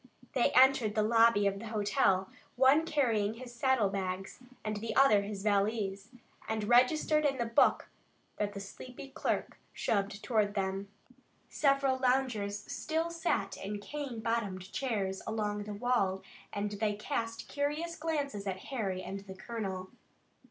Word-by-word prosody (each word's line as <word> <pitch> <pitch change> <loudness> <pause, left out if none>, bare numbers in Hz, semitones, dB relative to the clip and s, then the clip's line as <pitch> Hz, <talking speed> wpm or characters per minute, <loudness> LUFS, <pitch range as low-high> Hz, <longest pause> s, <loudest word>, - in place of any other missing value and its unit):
They 250 - +3
entered 255 -5 +5
the 215 - +3
lobby 225 -1 +5
of 195 0 +1
the 230 - -7
hotel, 200 -3 +2 0.3
one 270 +5 +5
carrying 225 -9 +1
his 245 0 -9
saddle 240 -4 +2
bags, 190 -1 -4 0.3
the 215 +1 -3
other 270 -7 +6
his 200 -1 -5
valise, 205 -1 0 0.4
and 220 -1 -1
registered 255 +7 +4
in 275 -2 +1
the 235 - 0
book 230 0 +3 0.5
that 205 -1 -1
the - - -4
sleepy 250 +7 -9
clerk - - -2
shoved 200 0 -1
toward 210 -3 +1
them. 195 0 -2 0.6
Several 275 -2 +2
loungers 245 -6 0
still 320 +2 -2
sat 335 - -1
in 205 +2 -4
cane 265 0 -5
bottomed 205 -5 -2
chairs 200 -7 -1
along 210 -2 -2
the 210 - -6
wall, 200 -5 +1 0.3
and 205 0 -2
they 210 0 -1
cast 230 0 -3
curious 300 +4 -2
glances 285 -10 -2
at 190 -1 -2
Harry 195 -8 -2
and 195 - -5
the 190 - -8
colonel. 190 -3 -5
220 Hz, 145 wpm, -32 LUFS, 200-260 Hz, 0.6 s, other